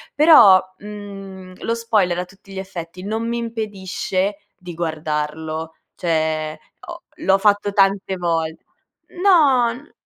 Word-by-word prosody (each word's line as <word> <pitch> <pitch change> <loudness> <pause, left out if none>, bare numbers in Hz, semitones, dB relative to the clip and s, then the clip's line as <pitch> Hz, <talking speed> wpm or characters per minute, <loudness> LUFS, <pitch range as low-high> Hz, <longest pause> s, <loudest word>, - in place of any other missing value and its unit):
però, 285 - +8 0.2
mhmm, 195 -3 -9
lo 230 - -1
spoiler, 215 -7 +1
a 180 - -3
tutti 195 +2 -19
gli 190 - -5
effetti 180 -2 -8
non 220 +3 -3
mi 235 0 -2
impedisce 205 -3 -3 0.2
di 180 -1 -9
guardarlo, 155 0 -3 0.2
cioè, 155 -2 -1 0.3
ho 340 0 -9
l'ho 195 0 +2
fatto 205 0 +2
tante 195 -1 +2
vol 165 -2 -1 0.7
no, 280 -11 +5
n 260 +5 -14
195 Hz, 125 wpm, -20 LUFS, 170-215 Hz, 0.7 s, però